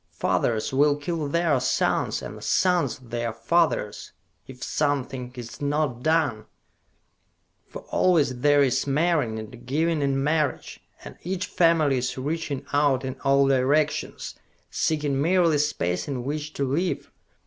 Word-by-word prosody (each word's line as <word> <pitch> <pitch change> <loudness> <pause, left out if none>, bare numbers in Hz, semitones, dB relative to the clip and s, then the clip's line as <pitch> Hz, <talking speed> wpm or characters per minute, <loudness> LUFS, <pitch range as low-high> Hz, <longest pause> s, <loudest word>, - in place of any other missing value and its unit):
Fathers 115 +2 0
will 145 +2 +4
kill 150 +1 -3
their 160 -2 +1
sons, 130 - 0
and - - -8
sons 175 -9 +1
their 120 -1 -4
fathers, 115 -1 0 0.3
if 125 -1 -10
something 135 -4 -2
is 120 +4 -9
not 145 -4 -1
done! 145 -8 +1 1.2
For - - -9
always 150 -9 +2
there 145 +1 +4
is 130 +1 0
marrying 145 -6 +1
and 115 +2 -9
giving 160 +3 0
in 135 -1 0
marriage, 150 -2 -1 0.2
and - - -10
each 185 +2 -3
family 165 -7 +2
is 125 +1 -3
reaching 145 0 -3
out 140 -3 +2
in 130 0 -4
all 140 0 +4
directions, 140 +3 0 0.4
seeking 145 -3 0
merely 170 -2 +3
space 90 - -1
in 130 -4 -3
which 150 +3 -4
to 140 - -1
live. 170 +7 -2
145 Hz, 135 wpm, -25 LUFS, 130-155 Hz, 1.2 s, will